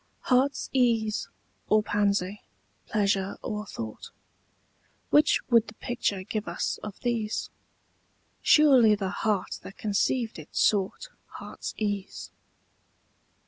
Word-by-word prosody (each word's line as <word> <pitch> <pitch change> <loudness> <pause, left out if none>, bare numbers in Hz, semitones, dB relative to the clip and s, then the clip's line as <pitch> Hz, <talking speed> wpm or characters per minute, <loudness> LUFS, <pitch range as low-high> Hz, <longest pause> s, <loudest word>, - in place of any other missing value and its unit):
HEART'S 265 +2 +1
ease 230 -5 +1 0.4
or 215 0 +4
pansy, 205 -1 0 0.5
pleasure 200 -2 0
or 210 0 -4
thought, 110 - -7 1.0
Which 295 - +5
would 230 -1 +5
the 215 - -11
picture 215 -7 -2
give 215 +1 -4
us - - -2
of 210 -2 -8
these? 230 -3 -2 0.9
Surely 260 -8 +6
the 195 -2 -3
heart 205 -2 -1
that 195 - -11
conceived 220 +1 0
it 155 - -11
sought 205 - +1 0.2
Heart's - - -7
ease. 205 -2 -3
215 Hz, 105 wpm, -27 LUFS, 200-235 Hz, 1.0 s, Surely